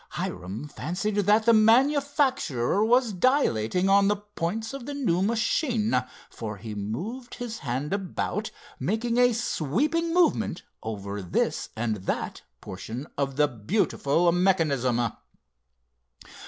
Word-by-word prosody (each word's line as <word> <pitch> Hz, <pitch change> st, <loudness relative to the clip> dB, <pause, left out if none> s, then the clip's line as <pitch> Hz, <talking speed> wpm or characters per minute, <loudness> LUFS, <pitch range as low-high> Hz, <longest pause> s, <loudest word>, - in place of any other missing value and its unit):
Hiram 95 Hz, +10 st, -4 dB
fancied 180 Hz, +8 st, -3 dB
that 205 Hz, +2 st, +3 dB
the 230 Hz, -, +6 dB
manufacturer 255 Hz, -, +3 dB
was 240 Hz, 0 st, +3 dB
dilating 180 Hz, -, +2 dB
on 200 Hz, 0 st, +5 dB
the 205 Hz, -, +3 dB
points 205 Hz, +3 st, -4 dB
of 275 Hz, -3 st, -7 dB
the 290 Hz, -, -4 dB
new 205 Hz, -11 st, +1 dB
machine, 230 Hz, +2 st, +1 dB, 0.4 s
for 110 Hz, -2 st, -6 dB
he 110 Hz, +1 st, -7 dB
moved 175 Hz, -, -5 dB
his 235 Hz, -2 st, -6 dB
hand 135 Hz, +5 st, -3 dB
about, 200 Hz, +2 st, -2 dB, 0.3 s
making 230 Hz, +4 st, 0 dB
a 245 Hz, 0 st, +6 dB
sweeping 240 Hz, -, 0 dB
movement 330 Hz, -, +2 dB, 0.2 s
over 100 Hz, -2 st, -5 dB
this 90 Hz, -, -1 dB
and 110 Hz, -1 st, -1 dB
that 95 Hz, -, -3 dB, 0.2 s
portion 110 Hz, +8 st, -6 dB
of 135 Hz, -1 st, -1 dB
the 150 Hz, +1 st, +4 dB
beautiful 145 Hz, -, +1 dB
mechanism. 140 Hz, -, +2 dB
195 Hz, 120 wpm, -26 LUFS, -, 0.4 s, the